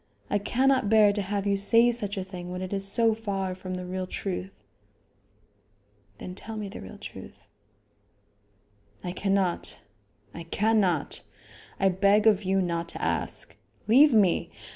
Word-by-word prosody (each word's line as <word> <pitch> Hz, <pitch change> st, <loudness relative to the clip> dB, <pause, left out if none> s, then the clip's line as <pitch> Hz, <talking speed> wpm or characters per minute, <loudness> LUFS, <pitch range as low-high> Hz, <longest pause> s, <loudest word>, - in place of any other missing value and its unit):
I 205 Hz, -, +2 dB
cannot 260 Hz, +2 st, +1 dB
bear 210 Hz, -2 st, +5 dB
to 205 Hz, -, -2 dB
have 200 Hz, +1 st, -3 dB
you 200 Hz, 0 st, +2 dB
say 230 Hz, +4 st, +5 dB
such 205 Hz, -4 st, -3 dB
a 190 Hz, -, -2 dB
thing 180 Hz, -2 st, -8 dB
when 180 Hz, +1 st, -5 dB
it 185 Hz, -, -5 dB
is 195 Hz, 0 st, 0 dB
so 225 Hz, +2 st, +4 dB
far 195 Hz, -4 st, -3 dB
from 185 Hz, 0 st, -6 dB
the 180 Hz, 0 st, -5 dB
real 185 Hz, 0 st, -4 dB
truth." 185 Hz, -, -5 dB, 1.5 s
"Then 180 Hz, -, -8 dB
tell 220 Hz, +4 st, -7 dB
me 210 Hz, -2 st, -5 dB
the -, -, -9 dB
real 95 Hz, -, -10 dB
truth." -, -, -11 dB, 1.6 s
"I 180 Hz, -, -3 dB
cannot; 185 Hz, -, 0 dB, 0.6 s
I 170 Hz, -, -7 dB
cannot. 200 Hz, -4 st, +1 dB, 0.6 s
I 195 Hz, -, +4 dB
beg 200 Hz, +3 st, +3 dB
of 210 Hz, -3 st, +5 dB
you 190 Hz, -1 st, +1 dB
not 170 Hz, -1 st, -2 dB
to -, -, -5 dB
ask. -, -, -2 dB, 0.3 s
Leave 275 Hz, +7 st, +7 dB
me! 195 Hz, -5 st, +3 dB
195 Hz, 155 wpm, -27 LUFS, 185-215 Hz, 1.6 s, Leave